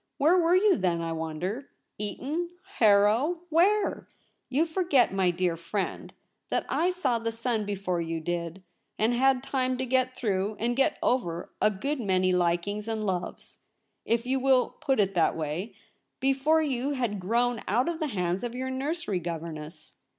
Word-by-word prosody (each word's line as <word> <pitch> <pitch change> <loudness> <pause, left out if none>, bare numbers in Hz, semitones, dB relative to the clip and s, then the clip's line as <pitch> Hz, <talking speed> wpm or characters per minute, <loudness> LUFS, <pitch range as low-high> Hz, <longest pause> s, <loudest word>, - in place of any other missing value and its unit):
Where 315 +6 +4
were 350 -1 +4
you 395 +1 +4
then, 180 -4 0
I 165 0 -3
wonder? 165 - -4 0.3
Eton, 285 - -3 0.3
Harrow, 220 +10 +4
where? 390 +6 +2 0.4
You 285 +5 +2
for 335 +3 -1
get, 280 - +3
my 190 -2 +2
dear 175 -1 0
friend, 170 +4 -4 0.4
that - - 0
I 350 - +2
saw 280 -11 0
the 230 0 -2
sun 230 -2 -2
before 190 -4 -2
you 165 0 -3
did, 170 +2 -4 0.3
and 225 +3 +2
had 260 +1 +3
time 255 -2 -1
to 260 - -2
get 255 0 +1
through 205 -2 -1
and 240 +2 0
get 270 +1 +2
over 175 -9 0
a 215 - +5
good 275 +9 -3
many 185 -4 +2
likings 180 +4 0
and 220 -1 -2
loves 180 -2 -4 0.2
— - - -49
if 230 +1 0
you 265 +1 +1
will 260 -1 +3
put 270 -4 +1
it 195 -1 +2
that 170 -3 +2
way 160 +7 -4 0.2
— - - -50
before 275 +4 +2
you 275 -1 -1
had 240 -7 -2
grown 235 +4 +1
out 240 +6 +2
of 340 -1 -2
the 310 - -1
hands 180 -5 -1
of 240 0 -4
your 260 +1 -3
nursery 270 - -2
governess. 165 -2 -7
230 Hz, 175 wpm, -28 LUFS, 185-270 Hz, 0.4 s, a